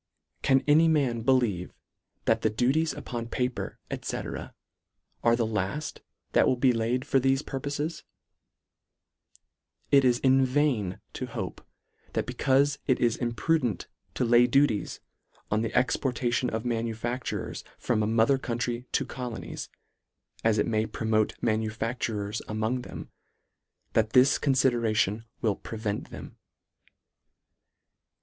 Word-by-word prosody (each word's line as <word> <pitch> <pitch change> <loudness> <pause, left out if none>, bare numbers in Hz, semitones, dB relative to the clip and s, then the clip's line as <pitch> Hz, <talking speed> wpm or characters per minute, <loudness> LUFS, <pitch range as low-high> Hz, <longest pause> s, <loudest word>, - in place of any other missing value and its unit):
Can 135 0 +3
any 155 +3 +6
man 135 -7 +2
believe 115 -8 +1 0.5
that 115 0 +2
the 110 - +2
duties 135 +9 +1
upon 120 -1 -5
paper, 125 +1 -3 0.2
&c. - - -3
are 115 0 -4
the 120 -1 0
laft 110 +7 -3 0.3
that - - +4
will - - +3
be 125 0 +3
laid 120 +3 0
for 135 - +3
thefe 135 +2 +1
purposes? 145 +4 -3 1.9
It 140 -1 +6
is 125 -2 +4
in 135 +1 +4
vain 130 -8 +1
to - - -4
hope, - - -5 0.5
that - - 0
becaufe 140 +2 +2
it 130 -2 +3
is 120 -2 +2
imprudent 120 - 0 0.3
to - - +1
lay 120 +1 +6
duties 135 -4 +1 0.5
on 105 +1 +2
the 115 - 0
LETTER - - -8
VIII. - - +7
85 - - +2
exportation 125 -1 0
of 110 +1 -3
manufactures 115 +1 -3
from 115 -3 0
a 105 - +1
mother 115 +4 +3
country 120 0 -3
to - - +1
colonies, 125 -3 -6 0.7
as 110 -1 +3
it 105 - +2
may 110 -1 0
promote 110 0 0
ma 115 - +3
nufactures 110 -1 -2
among 110 +4 -1
them, - - -9 0.8
that 110 -1 +2
this 130 +2 +5
conlidera 120 -5 +2
tion 105 +2 +1 0.2
will 110 -4 +1
prevent 110 -1 -4
them. - - -10
120 Hz, 135 wpm, -28 LUFS, 110-130 Hz, 1.9 s, VIII